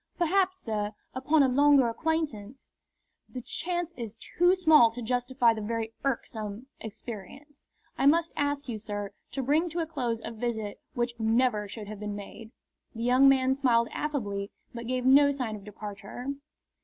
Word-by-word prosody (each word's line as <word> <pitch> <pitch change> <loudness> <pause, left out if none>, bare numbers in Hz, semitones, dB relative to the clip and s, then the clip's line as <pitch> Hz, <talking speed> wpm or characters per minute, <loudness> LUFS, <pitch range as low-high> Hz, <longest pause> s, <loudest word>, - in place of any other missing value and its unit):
"Perhaps, 375 +2 +2
sir, 210 - -3 0.2
upon 285 +3 +3
a - - +4
longer 280 0 +5
acquaintance 265 -3 -3 0.3
" - - -49
"The - - -2
chance 345 +6 -3
is 230 -2 -7
too 355 +9 +2
small 315 -10 +6
to 225 +2 -9
justify 245 0 +2
the 220 - -5
very 225 +1 -3
irksome 225 -4 -3
experience. 225 - -9 0.3
I 270 - +4
must 330 +3 +3
ask 285 0 -1
you, 225 -3 -4
sir, 205 -1 -5 0.2
to 270 0 -2
bring 310 +6 +2
to 335 +2 -3
a 330 - 0
close 250 -8 -2
a - - -5
visit 220 -2 -4
which 240 0 -1
never 225 -1 +2
should 210 +1 -8
have 210 -1 -7
been 210 -1 -4
made." 210 +2 -9 0.5
The 230 - -4
young 255 +3 +6
man 265 -1 +4
smiled 240 -4 +2
affably, 205 -10 -3 0.2
but 235 -1 -6
gave 255 0 -1
no 280 +2 +7
sign 250 -6 -2
of 205 - -10
departure. 210 +4 -7
245 Hz, 165 wpm, -28 LUFS, 220-285 Hz, 0.5 s, no